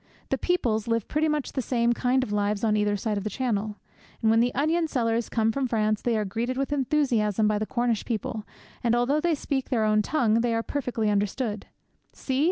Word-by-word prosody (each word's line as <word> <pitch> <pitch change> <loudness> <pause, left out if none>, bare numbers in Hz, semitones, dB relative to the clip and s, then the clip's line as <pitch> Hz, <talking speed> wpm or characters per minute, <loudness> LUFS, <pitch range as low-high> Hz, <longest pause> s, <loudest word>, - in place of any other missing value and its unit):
The - - +1
peoples 235 - 0
live 230 -2 0
pretty 310 +1 +1
much 300 -2 -1
the 265 - -1
same 240 -1 +1
kind 255 +2 +1
of 215 - -5
lives 205 0 0
on 215 -2 +3
either 210 -1 +1
side 210 0 -1
of - - -7
the 215 - -2
Channel. 215 -4 -2 0.5
And 220 - +4
when 225 - +4
the 245 +1 +3
onion 320 +3 +1
sellers 230 -5 0
come 225 -1 +1
from 265 +3 -1
France 215 -2 0
they 235 -2 +1
are 210 - 0
greeted 235 +6 -2
with 275 +2 -1
enthusiasm 240 -7 +1
by 210 -1 +1
the 215 - -2
Cornish 240 -3 0
people, 220 -1 -3 0.4
and 235 -1 +3
although 265 +5 +2
they 340 -1 +2
speak 275 -2 -3
their 225 -4 +1
own 215 0 +3
tongue, 230 -2 +2
they 235 -1 +1
are 225 - 0
perfectly 235 -7 -1
understood. 205 +1 -1 0.5
See! 265 -1 -2
230 Hz, 215 wpm, -26 LUFS, 215-260 Hz, 0.5 s, And